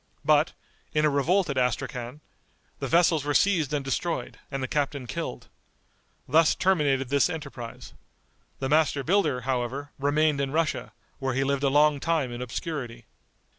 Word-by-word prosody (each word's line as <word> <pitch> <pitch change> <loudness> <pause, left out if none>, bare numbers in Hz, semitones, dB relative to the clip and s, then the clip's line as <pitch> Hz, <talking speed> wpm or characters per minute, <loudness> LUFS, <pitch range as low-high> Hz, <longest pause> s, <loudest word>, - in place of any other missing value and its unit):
But, - - +4 0.4
in 150 0 +3
a 150 - +3
revolt 170 +7 +2
at 130 - 0
Astrachan, 125 +2 -2 0.6
the - - -3
vessels 165 -3 +3
were 145 0 -1
seized 175 -8 +3
and 145 -2 -1
destroyed, 165 +6 -2
and 135 -2 -3
the - - -1
captain 140 -1 -1
killed. - - -5 0.8
Thus 160 +4 +4
terminated 145 -8 +1
this 140 0 +3
enterprise. 140 -7 -7 0.6
The 135 - -2
master 150 -1 +2
builder, 155 -6 +1
however, 130 +2 -2
remained 145 +1 +2
in 135 - -1
Russia, 160 +2 -1 0.3
where 130 -2 -2
he 135 - +2
lived 140 0 0
a 140 - +2
long 145 +1 +4
time 155 -4 0
in 120 +1 -6
obscurity. 125 -2 -5
140 Hz, 155 wpm, -26 LUFS, 130-155 Hz, 0.8 s, But